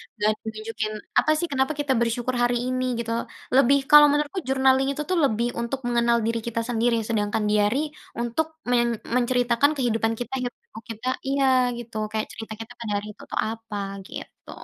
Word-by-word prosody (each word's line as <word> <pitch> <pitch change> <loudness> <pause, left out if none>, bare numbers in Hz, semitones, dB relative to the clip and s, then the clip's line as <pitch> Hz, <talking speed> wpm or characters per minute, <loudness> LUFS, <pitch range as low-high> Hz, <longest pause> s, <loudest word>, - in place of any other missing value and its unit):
enggak 210 -1 +1
ada 215 - -16
nunjukin 215 0 -4 0.3
apa 310 - +2
sih 345 - -1
kenapa 265 +2 +1
kita 285 -2 +1
bersyukur 235 +2 0
hari 240 0 +2
ini, 255 0 -1 0.2
gitu. 230 -1 -3 0.4
Lebih 275 +1 +6
kalau 295 0 +10
menurutku 295 +6 0
journaling 265 0 +3
itu 300 - -4
tuh 365 - +2
lebih 235 -2 +1
untuk 235 +3 -2
mengenal 235 0 +3
diri 230 0 0
kita 230 0 -1
sendiri, 235 0 +2
sedangkan 210 -1 0
diary 210 +5 +2 0.4
untuk 240 +7 0 0.2
men 240 -1 +3 0.3
menceritakan 245 +2 +3
kehidupan 225 -4 +1
kita, 245 0 -5
hiruk 245 -1 -4
pikuk 335 - -12
kita 250 +4 -7 0.2
iya, 275 0 +2 0.3
gitu 235 -2 -9 0.2
kayak 215 0 -2
cerita 225 -1 -7
kita 225 - -8
pada 230 -2 -4
hari 205 +1 -3
itu - - -15
tuh - - -1
apa, 225 -2 -7 0.3
gitu. - - -10
240 Hz, 180 wpm, -24 LUFS, 225-265 Hz, 0.4 s, kalau